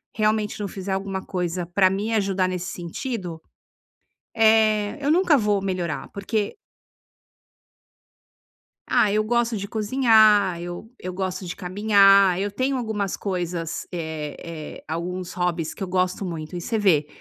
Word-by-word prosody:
realmente 215 -1 0
não 205 - -2
fizer 195 0 -6
alguma 190 0 -3
coisa 180 -1 -2
pra 185 +2 +3
me 205 +4 -2
ajudar 195 -3 +1
nesse 185 0 -3
sentido, 175 -1 -5 1.0
eh, 220 0 +3
eu 285 - +1
nunca 340 -1 +4
vou 210 -3 +1
melhorar, 185 -4 -3
porque 205 +1 -2 2.3
Ah, 205 - +3
eu 215 +1 +2
gosto 235 +1 +1
de 200 -1 -4
cozinhar, 215 -4 +4
eu 175 +6 -7
eu 185 0 -5
gosto 185 0 -3
de 175 - -5
caminhar, 195 -1 +4
eu 200 +1 -1
tenho 260 +5 0
algumas 215 -5 -2
coisas, 175 -4 -3
eh 160 -4 -4 0.4
eh, - - -20
alguns 175 +3 -4
hobbies 175 -3 -1
que 200 - -6
eu - - -3
gosto 185 +1 0
muito. 165 -1 -6
E 175 - -4
você 225 +6 -2
vê, 170 -8 +3
195 Hz, 145 wpm, -24 LUFS, 180-215 Hz, 2.3 s, nunca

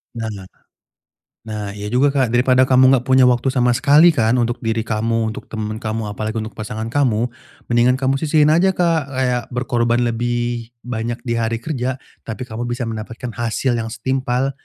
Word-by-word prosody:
Nah 110 -5 -5 1.0
nah 105 -2 -4
iya 105 0 -6
juga 130 +6 +2
Kak, 135 -2 +1
daripada 130 +1 +4
kamu 130 0 +5
enggak 130 -2 +2
punya 130 0 +5
waktu 125 0 +3
sama 125 -2 +2
sekali 145 +7 +5
kan, 115 -6 +1
untuk 120 -1 0
diri 115 -2 -1
kamu, 115 0 -1
untuk - - -9
temen 110 -1 -5
kamu, 110 -1 -3
apalagi 110 +2 -4
untuk 110 - -7
pasangan 110 +1 -6
kamu, 120 -4 +1 0.4
mendingan 120 +2 +4
kamu 135 +1 0
sisihin 155 0 +3
aja 185 +4 +3
Kak, 165 -5 +1
kayak 130 -2 -1
berkorban 120 -1 +1
lebih 120 0 -2 0.2
banyak 120 -1 -3
di 115 -2 -1
hari 115 0 -2
kerja, 130 -4 -2 0.3
tapi 115 +3 -5
kamu 120 0 -5
bisa 120 +1 -3
mendapatkan 115 +2 -6
hasil 120 +1 -1
yang 115 - -3
setimpal 130 +3 -1
120 Hz, 170 wpm, -19 LUFS, 115-130 Hz, 1.0 s, kamu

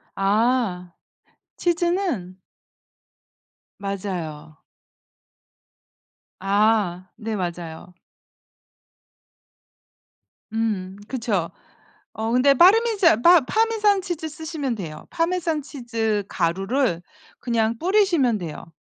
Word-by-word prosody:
아. 200 -3 +1 0.7
치즈는 345 - -1 1.4
맞아요. 180 -7 -5 1.8
아. 195 -2 +1
네. 220 -1 -4
맞아요. 175 -1 -5 2.6
음 200 -4 -2
그쵸. 215 -10 -1 0.6
어 220 +1 -3
근데 275 +3 +5
빠르미잔 390 - +5
빠 345 -1 +8
파마산 425 - +2
치즈 345 -4 -4
쓰시면 310 -5 -4
돼요. 165 -7 -8
파마산 330 -3 -1
치즈 230 -7 -2
가루를 195 +3 0 0.4
그냥 230 -1 0
뿌리시면 340 - +2
돼요. 165 -1 -8
225 Hz, 155 characters per minute, -23 LUFS, -, 2.6 s, 빠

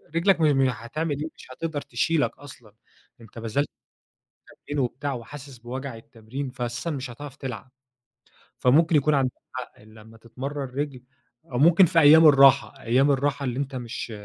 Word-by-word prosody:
رِجلك 170 +1 +3
م - - +3
م-هتعمل 135 +1 0
إيه 155 - -3
مش - - -14
هتقدر 155 +2 -4
تشيلك 145 +3 -1
أصلًا. 125 -7 -14 0.5
أنتَ 115 0 -12
بذلت 115 +6 -1 1.0
تمرين 145 0 -2
وبتاع 135 +3 -3
وحاسس 130 +2 -9
بوجع 130 +2 -6
التمرين 115 +4 -8
فأساسًا 120 +4 -4
مش 135 -5 -4
هتعرف 140 +3 -10
تلعب. 130 -3 -7 0.9
فممكن 160 +6 +4
يكون 150 +1 +3
عندك 130 -2 +1 0.2
حق 125 -4 -8
لما 110 +1 -16
تتمرن 135 +5 -6
رِجل 140 -3 -4 0.5
أو 120 - -1
ممكن 170 +6 +6
في 165 - +1
أيام 160 +2 +8
الراحة 140 -1 +5
أيام 130 +5 +3
الراحة 140 0 0
اللي 125 -1 -2
أنتَ 140 -1 -3
مش 120 -1 -6
135 Hz, 150 wpm, -25 LUFS, 120-145 Hz, 1.0 s, أيام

